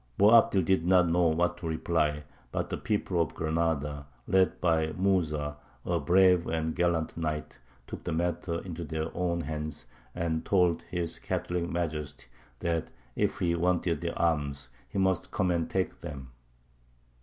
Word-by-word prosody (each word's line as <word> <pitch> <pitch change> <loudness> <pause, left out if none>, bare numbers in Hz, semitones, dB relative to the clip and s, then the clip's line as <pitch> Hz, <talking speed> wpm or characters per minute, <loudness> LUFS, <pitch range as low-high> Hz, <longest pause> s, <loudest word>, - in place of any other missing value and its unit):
Boabdil 105 -2 +6
did 95 -1 +2
not 90 0 +5
know 85 +1 +3
what 85 +2 +1
to 85 - -5
reply; 80 -2 0 0.3
but - - -2
the - - -1
people 100 -5 0
of 75 -5 -2
Granada, 80 -3 -1 0.2
led 95 -1 +2
by 80 -2 +2
Mūsa, 75 -6 0 0.3
a 85 -1 +1
brave 90 +3 +4
and 80 0 -1
gallant 85 -2 0
knight, 80 -2 -3 0.3
took - - -8
the - - -3
matter 85 0 -1
into 85 -2 -6
their 80 0 -4
own 85 -1 0
hands, 75 -2 -5 0.3
and 85 -2 -1
told 90 -4 +2
his 85 -2 -3
Catholic 90 -1 -2
Majesty 75 -6 -3 0.4
that 85 -2 -1 0.3
if - - 0
he 85 -1 +1
wanted 85 -2 +1
their 85 -1 -3
arms 70 -5 0 0.2
he - - -5
must 95 -1 +1
come 95 -1 0
and 85 -2 0
take 95 -1 -1
them! 70 -6 -8
85 Hz, 155 wpm, -29 LUFS, 80-90 Hz, 0.4 s, Boabdil